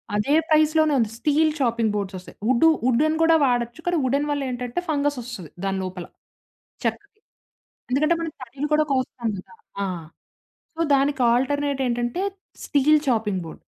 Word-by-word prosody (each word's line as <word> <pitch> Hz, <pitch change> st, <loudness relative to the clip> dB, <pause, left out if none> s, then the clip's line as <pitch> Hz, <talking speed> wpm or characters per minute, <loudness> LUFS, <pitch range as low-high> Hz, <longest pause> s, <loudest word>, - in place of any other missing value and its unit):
అదే 210 Hz, +8 st, +1 dB, 0.2 s
ప్రైజ్‌లోనే 310 Hz, 0 st, +4 dB
ఉంది. 225 Hz, -3 st, +1 dB
Steel 310 Hz, +2 st, +2 dB
chopping 235 Hz, -3 st, +1 dB
boards 200 Hz, -2 st, -3 dB
వస్తాయి. 185 Hz, -, -13 dB
వుడ్డు 260 Hz, +6 st, +5 dB, 0.2 s
వుడెన్ 285 Hz, +6 st, +3 dB
కూడా 325 Hz, 0 st, +5 dB
వాడొచ్చు. 245 Hz, +3 st, -1 dB
కానీ 350 Hz, -, +2 dB
వుడెన్ 280 Hz, +3 st, +1 dB
వల్ల 285 Hz, -, -1 dB
ఏంటంటే, 245 Hz, +3 st, -3 dB
ఫంగస్ 290 Hz, -2 st, 0 dB
వస్తది 230 Hz, -, -8 dB
దాని 195 Hz, 0 st, -1 dB
లోపల. 180 Hz, -1 st, -6 dB, 0.8 s
చెక్కకి. 405 Hz, +1 st, -4 dB, 0.7 s
ఎందుకంటే, 305 Hz, +6 st, +2 dB
మనం 325 Hz, -2 st, -4 dB
తడులు 265 Hz, +4 st, -5 dB
కూడా 305 Hz, 0 st, +4 dB
కోస్తాం 255 Hz, -3 st, -1 dB
కదా! 185 Hz, -, -12 dB, 0.3 s
ఆ! -, -, -1 dB, 0.9 s
సో, -, -, -6 dB
దానికి 275 Hz, -1 st, +1 dB
ఆల్టర్‌నేట్ 280 Hz, +2 st, 0 dB
ఏంటంటే, 240 Hz, +7 st, -1 dB, 0.4 s
స్టీల్ 300 Hz, +1 st, +4 dB
చాపింగ్ 210 Hz, -6 st, 0 dB
బోర్డ్. 160 Hz, -, -11 dB
265 Hz, 150 wpm, -23 LUFS, 235-305 Hz, 0.9 s, వుడ్డు